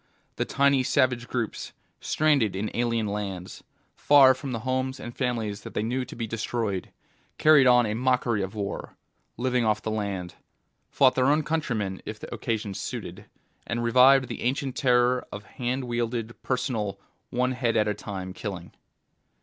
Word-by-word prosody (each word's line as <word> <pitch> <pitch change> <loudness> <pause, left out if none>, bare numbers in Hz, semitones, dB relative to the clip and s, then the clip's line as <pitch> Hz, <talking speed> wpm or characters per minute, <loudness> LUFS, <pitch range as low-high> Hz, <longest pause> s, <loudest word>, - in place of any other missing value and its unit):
The - - 0
tiny 140 -1 +3
savage 125 -1 +1
groups, 120 -4 -4 0.3
stranded 140 -11 +2
in 105 +3 -3
alien 115 -2 0
lands, 100 -3 -5 0.3
far 140 -2 +6
from 130 +1 -6
the 115 -2 -3
homes 130 +2 -2
and 120 - -8
families 115 -5 -2
that - - -10
they 105 - 0
knew 125 +3 -1
to - - -10
be 115 - -3
destroyed, 110 -3 -3 0.5
carried 150 -4 +6
on 125 -1 +6
a 105 - -1
mockery 125 -2 +1
of 95 +2 -4
war, 100 -1 -5 0.4
lived 125 +1 0
off 110 -1 +1
the 110 - -2
land, 100 -4 -3 0.6
fought 130 -2 +4
their 130 0 +2
own 150 +2 +3
countrymen 120 - -2
if 110 0 -7
the - - -8
occasion 110 -3 -3
suited, - - -6 0.4
and 120 +1 -2
revived 130 +3 +6
the - - -6
ancient 130 +1 -1
terror 125 -2 +3
of 105 0 -7
hand 125 +4 -3
wielded, 120 -1 -2
personal, 110 -7 -2 0.3
one 125 +1 0
head 120 -3 0
at 105 -1 +2
a 105 - +1
time 95 -2 -6
killing. 95 -4 -7
120 Hz, 165 wpm, -26 LUFS, 105-130 Hz, 0.6 s, far